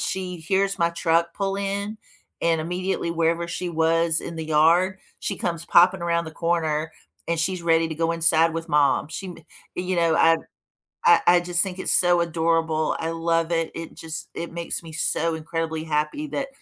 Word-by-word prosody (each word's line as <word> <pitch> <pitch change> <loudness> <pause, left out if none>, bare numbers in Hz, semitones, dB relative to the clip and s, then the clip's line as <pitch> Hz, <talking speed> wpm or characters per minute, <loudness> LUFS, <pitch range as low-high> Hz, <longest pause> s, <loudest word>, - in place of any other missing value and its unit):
she 185 -1 -2
hears 195 +4 0
my 170 0 +3
truck 170 0 +1
pull 195 0 -2
in, 200 +2 -3 0.4
and 165 -1 +1
immediately 180 +1 -2
wherever 170 +1 0
she 175 +1 -4
was 165 0 +2
in 170 - -7
the 160 - -4
yard, 170 +5 +3 0.2
she 195 - -3
comes 170 -2 -3
popping 180 +2 +5
around 170 0 0
the 160 - -7
corner, 160 -2 -1 0.4
and 170 0 -1
she's 175 +2 -1
ready 165 -1 +3
to 160 - -5
go 165 +1 0
inside 165 0 +3
with 165 +1 -4
mom. 145 -1 +2
She 190 +4 -6
m 180 - -8 0.4
and 180 - -3
you 185 - 0
know, 170 -1 +3
I 165 0 +5 0.7
I 175 - +6
I 175 0 +7
just 175 0 0
think 190 -2 -5
it's - - 0
so 175 -1 +4
adorable. 165 -1 0
I 165 - -2
love 165 0 0
it. 165 -1 0
It 165 -1 -7
just 160 -1 -7
it 170 - -6
makes 170 0 -4
me 165 - -10
so 160 +1 -1
incredibly 160 0 -3
happy 155 - -1
that, 275 -2 -3
170 Hz, 190 wpm, -24 LUFS, 160-175 Hz, 0.7 s, I